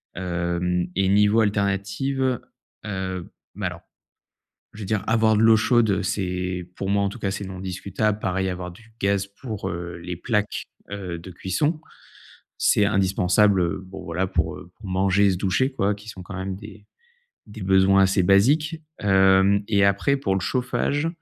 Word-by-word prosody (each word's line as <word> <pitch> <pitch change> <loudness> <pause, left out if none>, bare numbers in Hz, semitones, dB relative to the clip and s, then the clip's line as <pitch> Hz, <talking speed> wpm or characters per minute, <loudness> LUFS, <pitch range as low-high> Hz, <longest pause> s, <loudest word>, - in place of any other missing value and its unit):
Hem 90 0 -1
et 95 0 +2
niveau 105 +2 +4
alternatives, 105 +6 0 0.5
heu 95 -3 -4 0.2
bah, - - -2
alors, - - -7 0.9
je 110 - -10
veux 100 - -5
dire 105 -1 -1
avoir 110 -1 +3
de 110 - +3
l'eau 110 0 +7
chaude, 120 -1 +3
heu, 100 - +1
c'est, 90 -2 -2
pour 95 0 -3
moi, 100 0 +2
en 100 - +1
tout 120 - -9
cas, 95 - -1
c'est 100 -1 -5
non 95 -1 -7
discutable, 100 +3 -2
pareil, 95 0 -1
avoir 90 0 -5
du 110 +4 -18
gaz 100 0 +1
pour, 110 -7 -4
heu, 85 -1 -6
les 90 +1 -6
plaques, 105 +3 -1 0.2
heu, 95 -4 -5
de 90 +3 -10
cuisson. 145 - -1 0.8
C'est 105 - +3
indispensable, 95 0 +3
heu, 85 +2 -2
bon, 95 +1 -9
voilà, 90 +3 -1
pour, 80 -3 -1
heu, 90 - -13
pour 105 - -11
manger 95 +2 +3
et 100 - +4
se 90 - -2
doucher, 100 +8 +1
quoi, 105 -5 0
qui 105 +2 -14
sont, 95 -4 -8
quand 95 +1 -8
même, 95 0 -4
des 105 0 -12 0.6
des 105 -1 -9
besoins 95 +1 +4
assez 95 0 +3
basiques. 145 - +3 0.2
Hem 95 0 +4
et 100 -2 +3
après 100 +8 +2
pour 100 -8 0
le 95 - 0
chauffage, 140 - -1
100 Hz, 180 wpm, -24 LUFS, 95-105 Hz, 0.9 s, l'eau